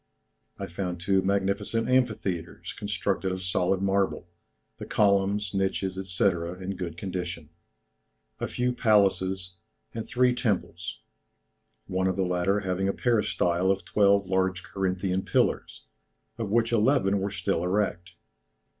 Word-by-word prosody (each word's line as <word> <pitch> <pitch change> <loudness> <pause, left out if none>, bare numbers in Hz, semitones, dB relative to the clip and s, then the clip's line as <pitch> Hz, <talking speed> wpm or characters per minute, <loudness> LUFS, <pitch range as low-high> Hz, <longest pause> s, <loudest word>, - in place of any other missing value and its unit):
I - - -4
found 90 0 -4
two 95 +2 +2
magnificent 100 +3 0
amphitheatres 110 -9 -1
constructed 100 -2 -2
of 95 0 -4
solid 95 +1 +1
marble, 95 -2 0 0.5
the - - -7
columns, 100 -1 +2
niches, 95 -1 0 0.2
&c., 90 - +1
in 90 +1 -1
good 85 -3 -5
condition, 85 -4 -5 0.9
a - - -2
few 125 0 -1
palaces, 95 -5 +2 0.4
and 115 -1 -5
three 125 0 +3
temples; 90 -8 -2 0.8
one 95 0 0
of 95 - 0
the 95 0 +1
latter 90 +3 +1
having 95 0 -1
a 100 - +1
peristyle 95 -6 +1
of 95 -2 0
twelve 100 -1 +3
large 95 -1 0
Corinthian 95 0 -1
pillars, - - 0 0.6
of 110 -3 -2
which 115 +2 +2
eleven 105 -4 +3
were 100 +1 -1
still 85 -3 -1
erect. 90 -2 -1
95 Hz, 130 wpm, -27 LUFS, 90-100 Hz, 0.9 s, three